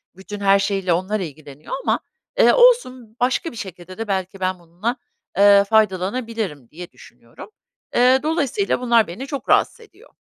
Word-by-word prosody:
bütün 200 +2 -9
her 200 0 +4
şeyiyle 195 -3 0
onlar 190 +5 -1
ilgileniyor 150 -3 -9
ama, - - +1 0.4
eee, - - +6
olsun, 260 - +3
başka 255 +6 0
bir - - -13
şekilde 185 -2 -9
de 225 -1 -5
"Belki 190 0 -3
ben 185 -1 -2
bununla, 180 +9 -4 0.4
eee, 200 0 +6
faydalanabilirim." 205 - -1
diye 175 +3 -10
düşünüyorum. - - -15 0.5
Eee, 255 +2 +5
dolayısıyla 320 - -1
bunlar 235 -3 +3
beni 240 +11 -7
çok 280 -1 -6
rahatsız - - +2
ediyor. 450 - -19
205 Hz, 150 wpm, -20 LUFS, 185-250 Hz, 0.5 s, eee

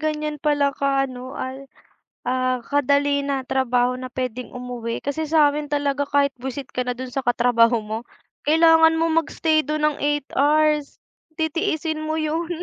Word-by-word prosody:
ganyan 305 -1 -2
pala 290 -2 +2
ka 275 0 +1
ano 255 0 -8
al 265 +1 -6 0.6
ah, 255 0 0
kadali 285 +1 +1
na 275 -2 -2
trabaho 250 -1 +1
na 255 0 -7
puwedeng 250 -1 -4
umuwi. 245 -2 -5
Kasi 285 +3 -2
sa'min 300 -1 +2
talaga 285 -1 0
kahit 280 -1 +1
bwisit 265 +1 -6
ka 250 - 0
na 250 - -1
do'n 255 +1 -7
sa 270 0 -2
katrabaho 235 -1 +3
mo. 215 +1 -4 0.5
Kailangan 325 +1 +6
mong 330 0 +1
mag-stay 310 0 +1
do'n 305 0 -2
ng - - -14
8 290 -1 0
hours, 300 +1 +2 0.4
titiisin 315 -1 -1
mo 315 +1 -2
'yun. 320 +2 -2
280 Hz, 155 wpm, -22 LUFS, 255-305 Hz, 0.6 s, Kailangan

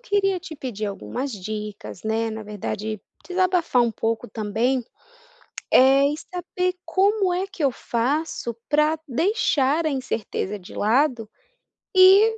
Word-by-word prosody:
queria 400 -5 +1
te 330 -2 -9
pedir 240 -7 -4
algumas 245 +6 -4
dicas, 210 0 -6
né, 225 +1 0
na 220 0 -5
verdade, 210 0 -4 0.3
desabafar 360 -8 +2
um 235 - +1
pouco 225 +1 -2
também, 225 +5 0 0.9
eh, 270 +2 +6
e - - -3
saber 360 +2 -3
como 390 -1 +2
é 370 +2 -1
que 375 -4 -7
eu 275 - +4
faço 245 0 -2
para 300 +1 +3
deixar 315 - +1
a 310 - +1
incerteza 225 -6 -3
de 180 - -13
lado, 235 0 +2 0.7
e 395 +4 +7
265 Hz, 130 wpm, -23 LUFS, 220-360 Hz, 0.9 s, e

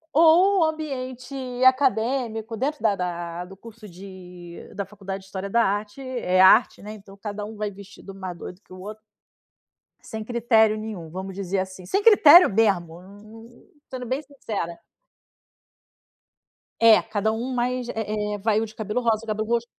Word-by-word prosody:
Ou 350 +5 +5
o - - +4
ambiente 270 -5 -5 0.3
acadêmico, 240 -3 +1
dentro 275 +5 -3
da 210 -3 +3
da 175 -1 -4
do 195 +1 -13
curso 220 0 -13
de 180 -1 -11 0.2
da 200 0 -3
faculdade 195 -1 -7
de - - -18
história 195 0 -6
da 235 +3 +3
arte. 205 +6 -2
É 245 -8 -1
arte, 195 +5 +5
né? 210 +1 -7
Então 200 -2 -14
cada 205 0 -6
um 215 +2 -8
vai 210 -1 -3
vestido 200 0 -12
um 195 - -14
mais 185 -2 -6
doido 180 +3 -10
que - - -29
o 185 - -10
outro 210 +3 -9 1.0
sem 220 -1 -7
critério 225 -2 +2
nenhum, 210 -7 -7
vamos 190 +2 -7
dizer 195 0 -2
assim. 185 -1 -6
Sem 395 - -1
critério 360 -6 +8
mesmo, 190 -6 0
hum, 215 +5 -16 0.2
sendo 255 -1 -6
bem 260 +4 -2
sincera. 215 - -6 2.0
É, 225 -1 +7
cada 220 -1 -1
um 240 +4 -4
mais 250 0 -1
é 210 -2 -3
é - - -5
vai 215 +1 +1
um 225 - -1
de 220 - -14
cabelo 220 +3 -3
rosa, 225 -2 0
o - - -12
cabelo 215 0 -2
roxo 235 0 0
215 Hz, 175 wpm, -24 LUFS, 195-240 Hz, 2.0 s, critério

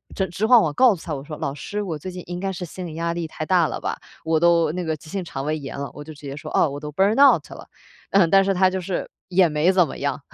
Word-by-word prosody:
直 190 - 0
直 190 +5 -2
晃 235 0 +7
晃 150 -2 0
告 250 - +5
诉 165 - -12
他， 160 - -3
我 135 - -7
说： 150 0 -8
“老 140 - -2
师， 205 +8 -5
我 175 -6 -4
最 185 +5 -7
近 180 - -7
应 175 0 -5
该 195 +1 -2
是 180 -1 -5
心 180 +2 -8
理 155 - -8
压 170 +1 -1
力 170 -1 -3
太 155 0 -6
大 175 -1 +3
了 - - -4
吧， - - -3 0.3
我 160 -1 +2
都 170 -2 +4
那 180 +2 -3
个 160 -2 -1
急 155 +1 -15
性 190 +2 -3
肠 135 -4 -6
胃 155 +1 -1
炎 140 -3 -7
了。” 140 0 -5
我 145 - -9
就 155 +1 -10
直 150 - -16
接 140 -1 -6
说： 150 - -8
“哦， 160 - +4
我 140 +1 -6
都 150 0 -7
Burnout 210 - +4
了。” - - -11 0.4
嗯， 190 -4 +4
但 195 +2 +6
是 195 0 +1
他 185 0 +4
就 190 0 -3
是 180 +1 -3 0.2
也 185 -1 +4
没 150 +4 +2
怎 180 -4 +3
么 - - -8
样， 140 -1 -2
170 Hz, 360 characters per minute, -23 LUFS, 150-190 Hz, 0.4 s, 晃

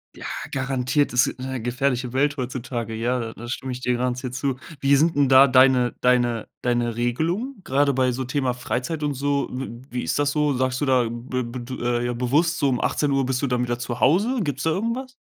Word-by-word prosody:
Ja, - - -9 0.3
garantiert, 135 +2 0
das 125 +1 +4
ist - - -5
'ne 130 -1 -4
gefährliche 125 +1 -1
Welt 145 +3 +2
heutzutage. 120 -3 -4
Ja, 120 +3 0
da 115 -1 -5
da 120 - -9
stimme 130 +1 -4
ich 125 - -6
dir 125 - +1
garantiert 125 +1 -2
zu. 130 0 -1 0.3
Wie 140 +1 +4
sind 160 +4 +3
'n 140 -2 +3
da 135 +1 +8
deine 130 -1 +4
deine 120 -2 +2 0.2
deine 120 -2 0
Regelungen, 170 - -1
gerade 140 0 +2
bei 130 -1 +2
so 130 +2 -3
Thema 130 -1 -1
Freizeit 130 +5 -3
und 145 - 0
so? 140 +1 0
W 125 -2 -6
wie 125 0 -2
ist 80 - -1
das 145 0 +1
so? 150 -1 +1
Sagst 130 0 0
du 145 - +2
da 130 -2 +4
b 120 +2 -4
b 120 +2 -6
d 120 -1 -2
ja 120 - -1
bewusst, 135 +8 +1
so 140 - +2
um 125 -2 0
18:00 140 -2 +1
bist 130 +1 -1
du - - +2
dann 125 -1 0
wieder 120 -1 -1
zu 120 0 -5
Hause? 210 - +3
Gibt's 145 -6 -2
da 160 - +2
irgendetwas? 235 +8 -3
130 Hz, 220 wpm, -23 LUFS, 120-140 Hz, 0.3 s, da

